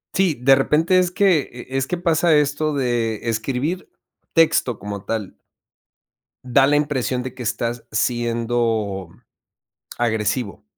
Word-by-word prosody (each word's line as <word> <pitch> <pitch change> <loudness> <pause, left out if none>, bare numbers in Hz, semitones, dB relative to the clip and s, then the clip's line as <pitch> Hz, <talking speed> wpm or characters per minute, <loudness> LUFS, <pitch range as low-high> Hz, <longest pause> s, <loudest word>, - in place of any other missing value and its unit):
Sí, 185 -5 +2
de 135 +2 +5
repente 155 +7 +3
es 180 -1 +2
que, 185 -2 +3
eh, 125 - -10
es 135 0 -1
que 180 - -2
pasa 170 -1 +2
esto 150 +1 +1
de 120 -4 -1
escribir 130 +10 -2 0.4
texto 155 -8 +3
como 100 -1 -6
tal 110 -4 -4 1.1
da 135 +2 +3
la 145 - +3
impresión 135 -4 0
de 130 - -6
que 125 - -8
estás 120 +1 -3
siendo 115 -4 -1 0.9
agresivo. 110 -2 -1
125 Hz, 130 wpm, -21 LUFS, 115-150 Hz, 1.1 s, de